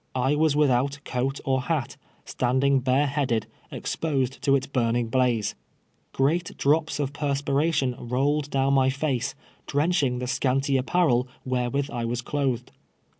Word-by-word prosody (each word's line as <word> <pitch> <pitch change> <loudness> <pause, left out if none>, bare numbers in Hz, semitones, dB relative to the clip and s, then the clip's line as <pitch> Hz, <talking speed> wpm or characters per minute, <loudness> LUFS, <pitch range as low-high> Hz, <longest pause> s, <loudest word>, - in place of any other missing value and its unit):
I 130 +2 +2
was 155 -1 +2
without 140 -1 +2
coat 135 +2 -2
or 130 -1 +1
hat, 135 -1 -2 0.3
standing 130 +2 +1
bare 130 +3 +2
headed, 135 -6 0 0.2
exposed 135 -5 -2
to 140 - +3
its 135 -1 -1
Lui 115 -2 +2
ning 120 -1 -1
hhize. 125 -5 +1 0.6
Great 165 +6 0
drops 155 +2 +1
of 140 -1 -2
perspiration 140 -1 0
rolled 140 +4 0
down 135 0 +1
my 135 -1 +4
face, 135 -2 -1 0.3
drenching 145 -3 +1
the 125 - -3
scanty 135 +2 0
apparel 130 -2 +2 0.2
wherewith 130 +2 -1
I 120 -1 -3
was 120 +1 -2
clothed. 130 -4 -2
135 Hz, 140 wpm, -25 LUFS, 125-145 Hz, 0.6 s, my